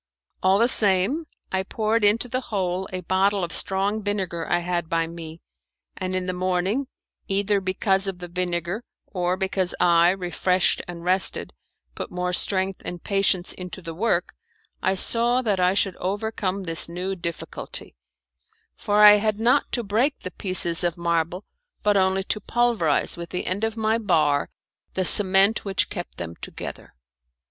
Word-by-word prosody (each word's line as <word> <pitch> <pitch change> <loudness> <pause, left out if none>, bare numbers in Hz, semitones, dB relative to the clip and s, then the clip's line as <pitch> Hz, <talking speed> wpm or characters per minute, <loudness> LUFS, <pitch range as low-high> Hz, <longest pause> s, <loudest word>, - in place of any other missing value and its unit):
All 190 +1 +3
the 230 +3 +3
same, 215 - +5 0.2
I 190 - +1
poured 215 +3 -1
into 210 +4 +3
the 255 +2 -2
hole 190 -3 -2
a 185 0 -4
bottle 190 +2 +1
of 170 - -4
strong 200 +5 0
vinegar 190 -5 -3
I 175 - +3
had 175 -1 -3
by 165 0 0
me, 165 -1 -9 0.5
and 185 0 -4
in 185 -1 -2
the 185 - -2
morning, 185 +8 -1 0.4
either 200 0 +1
because 190 +1 0
of 190 -2 -4
the 175 0 -8
vinegar 175 +3 -3 0.2
or 180 -1 -2
because 190 -1 +1
I, 170 0 +4
refreshed 185 0 0
and 170 -1 -8
rested, 185 +2 +1 0.4
put - - -6
more 180 0 -3
strength 190 +1 +2
and 175 -1 -7
patience 195 -2 +1
into 180 0 -8
the 165 -2 -8
work, 180 0 -1 0.5
I 190 - +1
saw 240 +5 +2
that 205 -5 0
I 180 +1 +2
should 195 -2 +1
overcome 200 -1 -3
this 165 -1 -2
new 180 +3 -3
difficulty; 170 - -6 0.8
for 210 +1 +2
I 210 0 +9
had 215 0 -1
not 235 +3 +2
to 240 - 0
break 230 +8 0
the 185 - -7
pieces 180 -2 +2
of 175 0 -1
marble, 170 +2 -1 0.4
but 210 -1 +3
only 190 0 +2
to 210 +2 -2
pulverize 225 -13 0
with 170 0 -7
the 180 - -4
end 190 +4 -3
of 225 0 -1
my 220 +1 +1
bar 155 -9 +1 0.5
the 185 - 0
cement 195 +2 +5
which 195 -2 -1
kept 175 -4 -7
them 85 -1 -7
together. - - -9
190 Hz, 165 wpm, -23 LUFS, 175-205 Hz, 0.8 s, I